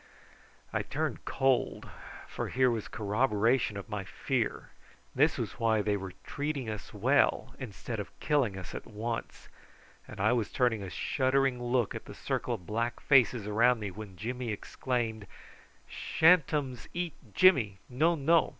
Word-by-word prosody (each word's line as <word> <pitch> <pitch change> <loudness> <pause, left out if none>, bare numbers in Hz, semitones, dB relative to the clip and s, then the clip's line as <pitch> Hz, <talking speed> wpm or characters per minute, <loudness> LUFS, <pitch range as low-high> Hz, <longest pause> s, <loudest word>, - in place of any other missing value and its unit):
I - - +1
turned - - -3
cold, 135 -2 +1 0.4
for - - -4
here 130 0 +3
was 115 -3 -3
corroboration 110 +1 +1
of 100 - -7
my 105 -2 -4
fear. 95 - -2 0.4
This - - +3
was - - -4
why 110 -2 +2
they 105 0 +1
were 95 -2 -5
treating 145 -4 -3
us 105 -3 -7
well 130 +8 +2
instead 115 -2 -5
of 100 - -8
killing 135 -10 +1
us 90 - -8
at - - -7
once; 115 +2 -5 0.6
and 105 - -10
I 110 +4 +3
was 115 -4 0
turning 120 -4 +1
a 95 - -5
shuddering 130 +4 +1
look 120 -3 +1
at - - -7
the - - -10
circle 120 - -2
of 90 -6 -12
black 115 +4 -2
faces 125 -5 +4
around 115 +4 +4
me 105 -2 -4
when 105 -1 -9
Jimmy 125 +3 -4
exclaimed: 110 0 -3 0.6
"Sha'n't 165 -1 +4
ums 135 -5 -2
eat 175 -3 -2 0.2
Jimmy. 130 - +5
No, 155 +7 +2
no. 165 +2 +3
120 Hz, 155 wpm, -30 LUFS, 105-135 Hz, 0.6 s, Jimmy